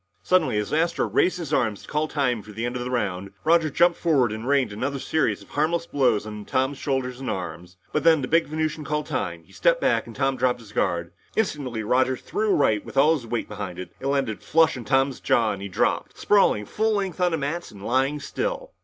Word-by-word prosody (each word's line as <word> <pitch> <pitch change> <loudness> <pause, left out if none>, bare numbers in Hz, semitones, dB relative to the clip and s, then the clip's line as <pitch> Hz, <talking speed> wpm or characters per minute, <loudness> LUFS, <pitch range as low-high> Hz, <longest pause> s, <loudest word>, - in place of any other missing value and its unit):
Suddenly, 180 -12 +2
as 105 +4 -2
Astro 165 +2 +1
raised 180 - +2
his 160 -4 -5
arm 115 -6 +2
to - - -14
call 150 +1 0
time 130 -7 0
for 105 - -12
the 115 +3 -3
end 120 +1 -3
of 125 - -2
the 125 - -4
round, 100 -6 -2
Roger 165 -1 +4
jumped 170 +4 +3
forward 135 -9 +2
and 110 +3 -5
rained 140 -6 +2
another 135 +6 -2
series 160 +3 0
of - - -20
harmless 165 +3 0
blows 130 -9 +1
on 105 -1 -7
Tom's 130 +5 -1
shoulders 130 -3 -2
and 135 - -4
arms. 90 0 -5 0.2
But 150 - 0
then, 165 -1 +6
as - - -3
the - - -2
big 165 +3 +3
Venusian 155 0 -2
called 150 +1 -2
time, 90 - -3
he - - -22
stepped - - +2
back - - +1
and - - -10
Tom 135 -1 0
dropped 125 0 +1
his 110 -3 -14
guard. 85 -4 -1 0.2
Instantly, 140 - -1
Roger 130 +3 +2
threw 425 +1 -2
a 390 - +4
right 110 - +2
with - - -10
all 150 +4 +6
his 130 -7 -4
weight 115 0 -2
behind 100 -4 -6
it. 90 -2 -7
It 135 - -4
landed 135 -6 0
flush 160 +1 +3
on 120 -3 -7
Tom's 135 +3 +2
jaw 115 -2 +2
and 100 -1 -5
he 100 - -5
dropped, 95 - 0
sprawling 195 - +3
full 220 - 0
length 190 -3 -2
on 180 -1 +3
the - - +1
mats 155 +4 -3
and 100 -1 -11
lying 135 +4 +1
still. - - -3
135 Hz, 240 wpm, -24 LUFS, 110-160 Hz, 0.2 s, then